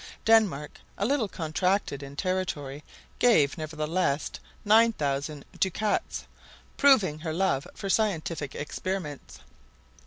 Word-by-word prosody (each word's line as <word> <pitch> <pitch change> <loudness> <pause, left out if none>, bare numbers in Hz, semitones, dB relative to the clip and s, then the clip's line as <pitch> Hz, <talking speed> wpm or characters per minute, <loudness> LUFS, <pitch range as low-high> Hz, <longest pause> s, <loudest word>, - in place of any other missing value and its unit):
Denmark, 210 -11 +3 0.2
a 200 - 0
little 260 -2 +1
contracted 180 -2 -1
in 140 0 -9
territory, 150 -6 -2 0.4
gave 155 -13 +4
nevertheless 155 0 -1 0.3
9,000 155 -10 +2
ducats, 205 +3 -1 0.5
proving 210 - +4
her 160 0 -4
love 170 -6 0
for 195 - -5
scientific 170 -8 0
experiments. 155 -1 -5
170 Hz, 95 wpm, -27 LUFS, 145-205 Hz, 0.5 s, gave